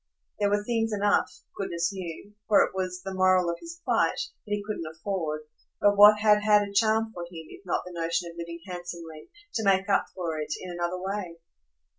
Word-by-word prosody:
There 205 -1 +2
were 205 0 +1
things 225 0 0
enough, 205 0 +2 0.2
goodness 170 -1 -2
knew 185 +2 -7
for 210 -2 +6
it - - -3
was 185 -1 -3
the 195 - -5
moral 185 -2 +3
of 170 - -6
his 335 0 -10
plight - - +2 0.3
that - - -9
he 205 - -5
couldn't 205 -6 -4
afford; 160 -3 -3 0.4
but 205 0 +4
what 210 +1 +8
had 210 -1 +5
had 210 -1 +5
a 200 - -10
charm 220 +1 +2
for 175 - -7
him 170 -2 -10
if - - -12
not - - 0
the 180 - -9
notion 170 +1 -1
of - - -16
living 170 0 -7
handsomely, 175 -4 -8 0.2
to 225 - -1
make 195 -1 +3
up 200 - +3
for 165 -4 -3
it, 150 0 -3
in 185 - -7
another 175 +1 -2
way? 190 -2 -4
185 Hz, 205 wpm, -27 LUFS, 170-205 Hz, 0.4 s, what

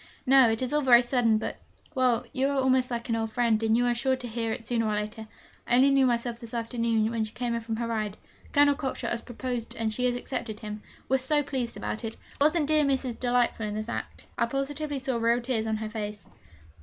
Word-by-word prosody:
'No, 265 -2 +6
it 225 +3 0
is 255 - -2
all 300 - +3
very 245 -3 +6
sudden; 240 -3 +2
but, 215 - -4 0.4
well, 250 -2 +2
you 270 0 +1
are 280 0 0
almost 260 -1 +3
like 235 -1 -3
an 230 - 0
old 225 -1 -2
friend, 230 -2 +2
and 225 0 +3
you 245 - +2
are 245 - +2
sure 260 +2 +1
to 255 -1 -7
hear 225 -1 -2
it 225 +1 -5
sooner 230 -1 0
or 215 - 0
later. 215 +1 -4 0.4
I 240 - +3
only 265 +3 +5
knew 270 -1 +4
myself 235 -1 -1
this 235 -1 -8
afternoon, 230 -1 0
when 230 -1 0
she 215 - -6
came 240 0 -2
in 235 - -2
from 225 0 -3
her 235 +1 -2
ride. 215 -3 -2 0.3
Colonel 285 0 +5
Cockshott 275 -2 -3
has 235 - -2
proposed 245 -1 -5
and 220 -1 -1
she 250 +3 -1
has 245 -1 +2
accepted 235 -3 -5
him. 210 -1 -6 0.3
We're 265 0 +2
so 290 +3 +2
pleased 260 -4 -3
about 220 - -4
it. 225 0 -5 0.2
Wasn't 305 +1 +4
dear 305 0 +4
Mrs. 265 -4 0
delightful 245 -3 +1
in 210 - -4
that 215 - -1
last 215 - -8
act? - - -6
I 235 - +3
positively 280 +3 -3
saw 260 -2 -1
real 230 +1 +2
tears 240 -3 -1
on 220 0 0
her 215 0 -4
face!' 210 -2 -5
240 Hz, 245 wpm, -27 LUFS, 225-260 Hz, 0.4 s, No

